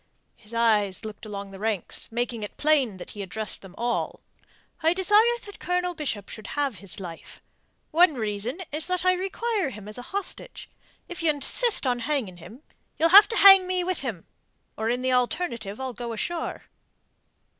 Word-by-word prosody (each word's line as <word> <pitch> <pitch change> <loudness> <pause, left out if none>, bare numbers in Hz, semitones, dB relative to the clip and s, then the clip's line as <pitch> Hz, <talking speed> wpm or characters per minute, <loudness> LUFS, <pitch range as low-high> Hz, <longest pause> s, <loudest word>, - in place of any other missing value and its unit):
His 210 -1 -12
eyes 220 -3 +1
looked 215 0 -8
along 200 -1 -7
the 195 - -11
ranks, 215 -1 -3
making 235 -1 -2
it 210 - -7
plain 280 -9 +2
that - - -9
he 205 - -7
addressed 215 +3 -2
them 195 -1 -13
all. 240 0 -2 0.6
"I 325 +2 +3
desire 420 +6 +4
that 405 - -11
Colonel 360 0 -1
Bishop 270 - -4
should 215 -2 -9
have 280 -7 -2
his 200 -1 -1
life. 170 -3 -9 0.5
One 330 -1 +5
reason 220 - -3
is 310 +3 -1
that 365 0 -1
I 370 - +5
require 390 0 -2
him 210 -5 -10
as 215 +3 -7
a 245 - -10
hostage. 400 0 -5 0.4
If 350 - -7
ye 330 - +2
insist 305 - +2
on 245 -1 +1
hanging 240 -9 -2
him, 225 - -13 0.3
ye'll 330 - +3
have 405 +4 +9
to 455 - -3
hang 390 -2 +9
me 365 -1 +1
with 365 -1 -1
him, 225 -11 -5 0.5
or 220 +1 -2
in 245 +2 -1
the 260 0 +1
alternative 245 - -1
I'll 260 -1 -4
go 235 0 -5
ashore." 335 +9 -4
255 Hz, 180 wpm, -25 LUFS, 215-355 Hz, 0.6 s, have